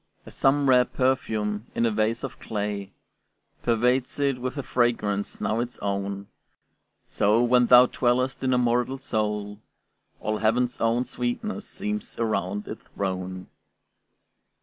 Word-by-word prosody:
As - - -12
some 140 +1 +2
rare 125 -1 +6
perfume 110 -5 -1
in 115 - +2
a 115 - +2
vase 110 +2 0
of - - -6
clay 105 -2 -4 0.7
Pervades 125 +3 +1
it 140 -3 +1
with 130 +3 -3
a 140 - -2
fragrance 105 -5 0
not 110 - 0
its 120 +1 -3
own, 100 0 -3 0.8
So, 110 +4 +2
when 125 0 +4
thou 125 +1 +8
dwellest 125 +2 0
in 130 - +1
a 125 - +3
mortal 125 +2 +1
soul, 105 -4 -2 0.6
All 110 0 -2
heaven's 120 +3 +1
own 115 +2 +2
sweetness 130 - -3
seems 210 +3 -4
around 105 -3 -1
it - - -7
thrown. 95 -1 -4
120 Hz, 135 wpm, -25 LUFS, 105-125 Hz, 0.8 s, thou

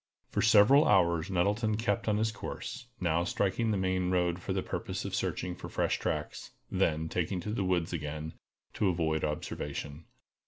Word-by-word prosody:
For - - 0
several 110 +7 +6
hours 85 +1 +3
Nettleton 105 +4 +1
kept 115 -2 -1
on 105 -1 +2
his 110 +1 +1
course, 125 +4 -6
now 85 -1 +1
striking 100 +5 0
the 105 - +1
main 95 -1 0
road 90 -1 +1
for - - -5
the - - 0
purpose - - -4
of - - -4
searching 90 - -1
for - - -8
fresh - - 0
tracks, 75 0 -3 0.2
then 80 -4 +1
taking 90 +3 -1
to 105 - -4
the 105 -2 -1
woods 90 -2 0
again, 75 0 -4 0.4
to 100 - +1
avoid 80 -3 0
observation. 75 0 -4
90 Hz, 170 wpm, -31 LUFS, 80-105 Hz, 0.4 s, several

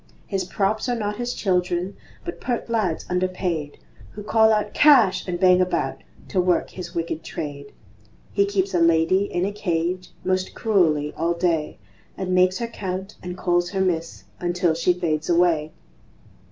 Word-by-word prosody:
His 195 -3 -2
props 210 +5 -1
are 245 - +1
not 210 -2 -3
his 245 0 -3
children, 180 -1 0 0.3
But 345 - -6
pert 240 -2 -3
lads 205 -8 0
underpaid, 180 -4 -2 0.4
Who 210 - -8
call 220 +1 +4
out 210 -1 0
"Cash!" 235 -13 +5
and 175 -1 -2
bang 185 -1 +5
about 185 - -1 0.3
To 185 - +2
work 180 -1 +1
his 175 -1 -8
wicked 165 -1 -3
trade; 140 -2 -6 0.6
He 200 -1 +3
keeps 195 -1 0
a 175 - +2
lady 165 +4 +3
in 180 -2 -1
a 200 - -1
cage 180 -2 -2 0.2
Most 185 0 -1
cruelly 160 -9 +2
all 170 +1 0
day, 170 -3 0 0.4
And 185 -1 -2
makes 185 +1 +4
her 235 - -3
count 190 -3 -5
and 180 0 -6
calls 175 -1 +1
her 195 0 -1
"Miss" 170 -3 -1 0.2
Until 175 -1 +1
she 165 +2 +2
fades 160 -3 -1
away. 170 -3 +2
180 Hz, 165 wpm, -23 LUFS, 170-200 Hz, 0.6 s, Cash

